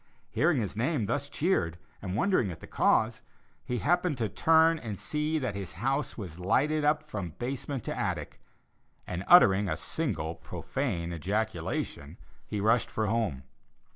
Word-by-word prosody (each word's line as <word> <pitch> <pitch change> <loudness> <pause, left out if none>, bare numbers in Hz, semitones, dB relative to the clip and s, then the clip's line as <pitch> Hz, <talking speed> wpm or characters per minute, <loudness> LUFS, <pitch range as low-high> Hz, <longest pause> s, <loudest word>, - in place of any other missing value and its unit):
Hearing 150 +4 +2
his 105 -4 -3
name 125 +1 0
thus 140 +7 -2
cheered 115 - 0 0.2
and 95 -1 -4
wondering 125 - +2
at 80 -2 -7
the - - -10
cause, 110 0 +2 0.4
he 125 - -2
happened 175 +2 +1
to 115 -3 -1
turn 160 +9 +4
and 110 -6 -5
see 150 - -1
that 130 -8 -2
his 100 -2 -6
house 135 - -1
was 90 -6 -7
lighted 145 +12 +2
up 150 +1 +2
from 95 - -5
basement 130 0 -4
to - - -3
attic, - - -3 0.6
and 90 +1 -4
uttering 100 - +7
a 80 - -1
single 100 - -2
profane 85 - -3
ejaculation, 105 +7 -3 0.3
he 105 - -3
rushed 110 +3 +2
for 110 - -1
home. 105 - -1
115 Hz, 155 wpm, -29 LUFS, 95-150 Hz, 0.6 s, uttering